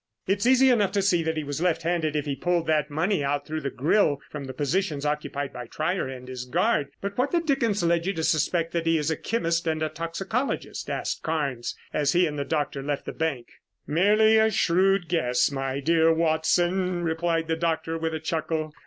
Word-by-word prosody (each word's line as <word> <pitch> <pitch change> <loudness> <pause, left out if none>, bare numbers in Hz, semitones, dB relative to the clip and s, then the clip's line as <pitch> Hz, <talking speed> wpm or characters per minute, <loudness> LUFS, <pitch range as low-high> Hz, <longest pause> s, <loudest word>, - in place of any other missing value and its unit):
"It's 200 +4 +1
easy 260 +1 +6
enough 205 -6 +2
to 200 - +2
see 180 -3 +3
that 160 0 -2
he 155 - -1
was 145 +2 -4
left 165 -2 +1
handed 165 -3 0
if 150 -1 -1
he 140 -2 -2
pulled 175 +4 0
that 155 -1 +1
money 160 +3 0
out 145 +1 -1
through 155 +1 -4
the 140 - -2
grill 145 +3 +2
from 145 -2 -6
the 130 - -6
positions 150 +2 -1
occupied 145 -1 -2
by 125 -1 -7
Trier 160 +5 -1
and 130 -1 -8
his 130 -1 -5
guard, 170 - +1
but 200 0 -4
what 265 +3 +2
the 345 - +2
dickens 240 - 0
led 170 +1 +1
you 195 - +1
to 160 - -3
suspect 165 +2 +1
that 165 -1 -2
he 165 0 +4
is 150 +1 0
a - - +1
chemist 170 -6 -1
and 155 -1 0
a 155 - 0
toxicologist?" 170 - -3
asked - - -3
Carnes 140 -7 -2 0.2
as 145 -1 +1
he 180 +1 +4
and 150 -2 -3
the - - 0
doctor 145 -3 -2
left 140 0 -3
the - - -4
bank. 150 -7 -2 0.4
"Merely 210 +7 +4
a 220 0 +4
shrewd 190 -1 +2
guess, 135 -7 +1
my 135 0 -2
dear 165 +2 +3
Watson," 175 +3 +1
replied 165 0 0
the 165 - 0
doctor 165 0 -1
with 160 0 -2
a - - -3
chuckle. 160 -1 -2
160 Hz, 215 wpm, -26 LUFS, 150-180 Hz, 0.4 s, easy